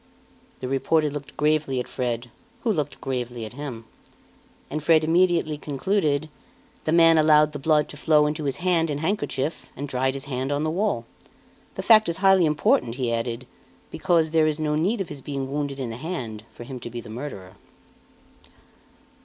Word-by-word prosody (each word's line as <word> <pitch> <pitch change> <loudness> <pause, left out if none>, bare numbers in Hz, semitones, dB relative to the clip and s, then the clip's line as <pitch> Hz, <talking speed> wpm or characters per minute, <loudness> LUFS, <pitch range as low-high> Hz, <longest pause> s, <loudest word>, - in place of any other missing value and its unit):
The 130 - -3
reporter 150 +3 +1
looked 145 -1 -8
gravely 150 -3 +1
at 125 - -4
Fred, 120 -2 -3 0.3
who 225 - +1
looked 150 -5 -3
gravely 125 -3 -4
at 110 - -9
him. 130 -5 -7 0.8
And 155 +2 -4
Fred 160 +1 +4
immediately 165 -2 +2
concluded: 150 0 0 0.6
"The 155 - +1
man 165 -1 +6
allowed 150 -1 +5
the 145 - -6
blood 150 +1 +2
to 145 - -9
flow 150 0 +4
into 150 +1 -2
his 140 - -1
hand 165 -3 +3
and 145 0 -2
handkerchief, 155 -5 -2
and 145 +2 -4
dried 130 0 0
his 135 - -6
hand 135 0 -3
on 145 +1 0
the 155 - 0
wall. 180 - -1 0.7
The 190 - -4
fact 215 -1 +6
is 165 - -2
highly 190 -3 +5
important," 125 -5 +2
he 125 -3 -1
added, 115 +2 -3 0.5
"because 165 -4 +1
there 160 -1 +4
is 155 0 0
no 150 -1 0
need 190 +8 +1
of 185 - -4
his 145 -2 -8
being 135 -1 -4
wounded 140 -1 -3
in 125 -3 -3
the 115 - -6
hand 120 -9 -5
for - - -11
him 125 +1 -7
to 120 - -7
be 120 0 -6
the - - -10
murderer." 110 -6 -7
145 Hz, 185 wpm, -24 LUFS, 130-160 Hz, 0.8 s, man